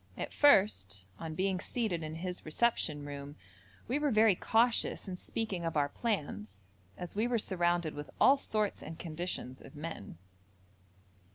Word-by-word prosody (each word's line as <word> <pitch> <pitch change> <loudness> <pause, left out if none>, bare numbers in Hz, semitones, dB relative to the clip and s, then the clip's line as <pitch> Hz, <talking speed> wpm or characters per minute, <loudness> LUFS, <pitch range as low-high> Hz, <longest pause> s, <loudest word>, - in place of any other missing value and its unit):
At - - -4
first, 145 - +4
on 160 -1 -5
being 190 0 0
seated 210 -6 -2
in 155 0 -5
his 180 +2 -5
reception 155 -4 +1
room, 145 0 -7 0.5
we 260 +5 0
were 295 -1 +2
very 220 -3 +5
cautious 225 +4 +2
in 185 - -4
speaking 195 -1 -3
of 165 -2 -1
our 145 -1 +2
plans, 140 - -3 0.4
as 180 +1 -7
we 220 +3 +2
were 245 -1 +1
surrounded 175 -5 +1
with 145 0 -7
all 275 - +7
sorts 215 -6 -1
and 160 +1 -8
conditions 165 -6 -5
of 135 - -13
men. 145 - -7
175 Hz, 155 wpm, -32 LUFS, 150-215 Hz, 0.5 s, all